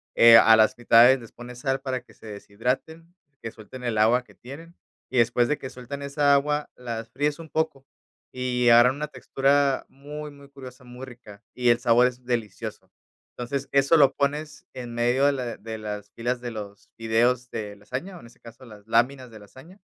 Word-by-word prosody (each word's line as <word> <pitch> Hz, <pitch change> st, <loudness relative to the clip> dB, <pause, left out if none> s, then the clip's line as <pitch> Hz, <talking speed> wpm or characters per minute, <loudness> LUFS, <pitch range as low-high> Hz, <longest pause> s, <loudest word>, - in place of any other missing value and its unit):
Eh, 115 Hz, 0 st, +8 dB
a 115 Hz, 0 st, +7 dB
las 110 Hz, -1 st, +3 dB
mitades 120 Hz, +2 st, +5 dB
les 115 Hz, -2 st, -13 dB
pones 120 Hz, 0 st, -11 dB
sal 135 Hz, +1 st, -2 dB
para 130 Hz, -2 st, -3 dB
que 125 Hz, -, -22 dB
se 110 Hz, -, -15 dB
deshidraten, 125 Hz, +11 st, -5 dB, 0.3 s
que 115 Hz, -, -5 dB
suelten 120 Hz, +3 st, -12 dB
el 120 Hz, -3 st, -2 dB
agua 115 Hz, +4 st, +3 dB
que -, -, -22 dB
tienen, 165 Hz, +7 st, -12 dB, 0.3 s
y 130 Hz, -, -3 dB
después 120 Hz, 0 st, +3 dB
de 150 Hz, -, -1 dB
que 130 Hz, -, -8 dB
sueltan 130 Hz, +3 st, -8 dB
esa 140 Hz, 0 st, +2 dB
agua 150 Hz, +1 st, -1 dB
las 115 Hz, -2 st, -7 dB
fríes 145 Hz, +5 st, -2 dB
un 165 Hz, -1 st, -11 dB
poco, 155 Hz, -4 st, -2 dB, 0.5 s
y 125 Hz, -1 st, 0 dB
agarran 120 Hz, +2 st, +6 dB
una 150 Hz, +1 st, -4 dB
textura 140 Hz, -1 st, 0 dB
muy, 150 Hz, +2 st, -9 dB
muy 140 Hz, -1 st, -16 dB
curiosa, 130 Hz, -2 st, -12 dB
muy 125 Hz, +1 st, -10 dB
rica, 115 Hz, -4 st, -14 dB
y 125 Hz, -1 st, +1 dB
el 120 Hz, 0 st, +4 dB
sabor 120 Hz, 0 st, +4 dB
es 125 Hz, 0 st, -8 dB
delicioso. 115 Hz, -5 st, -5 dB, 0.4 s
Entonces, 135 Hz, +3 st, -4 dB
eso 140 Hz, +4 st, +4 dB
lo 140 Hz, -3 st, +5 dB
pones 150 Hz, +2 st, -3 dB
en 120 Hz, -2 st, -8 dB
medio 120 Hz, +3 st, +1 dB
de 145 Hz, -, +4 dB
la 125 Hz, -4 st, -5 dB
de 110 Hz, +1 st, -7 dB
las 105 Hz, -1 st, -7 dB
filas 120 Hz, +2 st, -3 dB
de 120 Hz, -1 st, -5 dB
los 105 Hz, -2 st, -9 dB
fideos 120 Hz, +2 st, 0 dB
de 105 Hz, -3 st, -6 dB
lasaña, 130 Hz, -, -7 dB
o, -, -, -12 dB
en 115 Hz, -, -14 dB
este 115 Hz, -, -21 dB
caso, 115 Hz, +2 st, -15 dB
las 105 Hz, -3 st, -15 dB
láminas 125 Hz, +2 st, 0 dB
de 110 Hz, -, -12 dB
lasaña. 135 Hz, -, -16 dB
125 Hz, 200 wpm, -24 LUFS, 115-140 Hz, 0.5 s, Eh